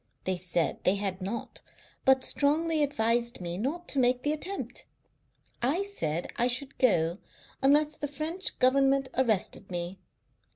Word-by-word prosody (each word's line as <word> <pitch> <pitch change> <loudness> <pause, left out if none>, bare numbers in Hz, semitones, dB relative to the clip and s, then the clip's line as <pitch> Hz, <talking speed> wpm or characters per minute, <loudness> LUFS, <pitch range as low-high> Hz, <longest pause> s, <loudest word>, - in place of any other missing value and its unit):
They 185 - 0
said 175 -2 0
they 185 - +4
had 195 -2 -3
not, 205 +5 -5 0.4
but 265 0 +5
strongly 310 +2 +2
advised 235 -4 +1
me 175 -1 -4
not 290 - -3
to 280 - 0
make 250 0 +2
the 295 - +1
attempt. 375 +6 -5 0.7
I 290 +11 +1
said 170 - -2
I 240 - +3
should 255 +2 -2
go, 175 - +2 0.4
unless 295 +3 +3
the 290 - -3
French 315 +6 0
Government 270 +1 +3
arrested 215 -5 0
me.... 175 +1 -4
255 Hz, 140 wpm, -29 LUFS, 195-290 Hz, 0.7 s, but